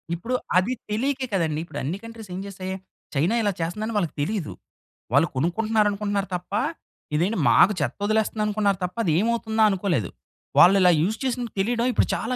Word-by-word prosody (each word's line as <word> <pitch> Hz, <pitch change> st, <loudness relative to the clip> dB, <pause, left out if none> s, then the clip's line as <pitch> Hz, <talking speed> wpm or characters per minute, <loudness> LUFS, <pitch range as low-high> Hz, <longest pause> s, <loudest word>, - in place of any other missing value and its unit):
ఇప్పుడు 230 Hz, +9 st, -3 dB, 0.2 s
అది 195 Hz, +8 st, +2 dB, 0.2 s
తెలీకే 260 Hz, +5 st, 0 dB
కదండి! 160 Hz, -5 st, 0 dB
ఇప్పుడు 170 Hz, -, -7 dB
అన్ని 155 Hz, +8 st, -2 dB
కంట్రీస్ 230 Hz, -3 st, -10 dB
ఏం -, -, -4 dB
చేస్తాయి, 190 Hz, -1 st, -6 dB, 0.4 s
చైనా 165 Hz, +11 st, +2 dB
ఇలా 205 Hz, -2 st, +1 dB
చేస్తందని 210 Hz, +7 st, -3 dB
వాళ్ళకి 175 Hz, -6 st, -1 dB
తెలీదు. 185 Hz, +1 st, -2 dB, 0.6 s
వాళ్ళు 145 Hz, +5 st, +5 dB
కొనుక్కుంటున్నారనుకుంటున్నారు 205 Hz, +4 st, 0 dB
తప్ప, 180 Hz, +2 st, -7 dB, 0.6 s
ఇదేంటి 185 Hz, +8 st, +1 dB
మాకు 210 Hz, -, +6 dB
చెత్త 145 Hz, -, -2 dB
వదిలేస్తుందనుకున్నారు 210 Hz, -2 st, +1 dB
తప్ప, 180 Hz, 0 st, -3 dB
అది 165 Hz, -, +2 dB
ఏమవుతుందా? 225 Hz, 0 st, +1 dB
అనుకోలేదు. 180 Hz, -, 0 dB, 0.5 s
వాళ్ళు 180 Hz, +3 st, +8 dB
ఇలా 180 Hz, -1 st, +6 dB
యూస్ 210 Hz, +7 st, 0 dB
చేసినది 245 Hz, -3 st, -2 dB
తెలియడమే, 235 Hz, +4 st, +1 dB
ఇప్పుడు -, -, +2 dB
చాలా 255 Hz, -, -2 dB
205 Hz, 155 wpm, -24 LUFS, 180-220 Hz, 0.6 s, వాళ్ళు